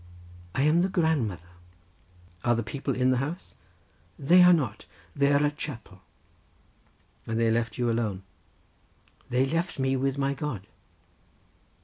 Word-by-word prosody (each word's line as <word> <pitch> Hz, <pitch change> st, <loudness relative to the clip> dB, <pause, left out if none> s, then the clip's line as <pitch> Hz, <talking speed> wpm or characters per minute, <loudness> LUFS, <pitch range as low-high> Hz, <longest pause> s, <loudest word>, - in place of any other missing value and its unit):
"I 135 Hz, -, +1 dB
am 155 Hz, +4 st, +4 dB
the 190 Hz, -, +1 dB
grandmother." 120 Hz, -, -1 dB, 0.9 s
"Are 120 Hz, 0 st, +3 dB
the 115 Hz, -, -2 dB
people 135 Hz, +3 st, -3 dB
in 130 Hz, 0 st, +2 dB
the 130 Hz, -, +2 dB
house?" 150 Hz, +8 st, -5 dB, 0.6 s
"They 175 Hz, +6 st, +5 dB
are 180 Hz, 0 st, +8 dB
not—they 140 Hz, -, -1 dB
are -, -, +4 dB
at 140 Hz, -, +3 dB
the 145 Hz, -, +2 dB
chapel." 115 Hz, -, -8 dB, 1.3 s
"And 110 Hz, 0 st, -1 dB
they 115 Hz, -1 st, +2 dB
left 115 Hz, -1 st, -1 dB
you 120 Hz, -1 st, 0 dB
alone?" 105 Hz, -5 st, -2 dB, 1.1 s
"They 125 Hz, +2 st, +2 dB
left 165 Hz, +5 st, -2 dB
me 135 Hz, 0 st, +1 dB
with 135 Hz, +1 st, -1 dB
my 140 Hz, 0 st, 0 dB
God." 135 Hz, -9 st, -5 dB
135 Hz, 140 wpm, -27 LUFS, 115-150 Hz, 1.3 s, are